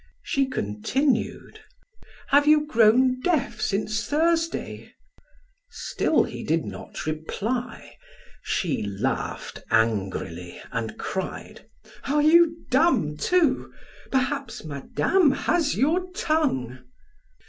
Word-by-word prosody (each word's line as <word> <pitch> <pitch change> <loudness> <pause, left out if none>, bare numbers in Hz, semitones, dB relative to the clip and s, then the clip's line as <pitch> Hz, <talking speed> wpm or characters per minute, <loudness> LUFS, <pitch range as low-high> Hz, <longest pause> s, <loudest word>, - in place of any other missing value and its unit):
She 275 -1 0
continued: 255 - -1 0.7
"Have 285 +1 +4
you 300 0 +5
grown 255 -1 +4
deaf 255 -10 0
since 215 +2 -1
Thursday?" 330 +2 -1 0.8
Still - - 0
he - - -6
did 160 -4 0
not 95 -2 -7
reply. 210 +11 -4 0.5
She 170 -6 -1
laughed 100 -1 -3
angrily 95 -6 -1
and 115 -2 -4
cried: 190 - -5 0.4
"Are 295 +2 +2
you 330 +1 +6 0.2
dumb, 260 - +3
too? 325 - +1 0.4
Perhaps 270 -1 -1
Madame 220 - +1
has 325 -2 0
your 345 - +1
tongue?" 300 - 0
255 Hz, 95 wpm, -25 LUFS, -, 0.8 s, you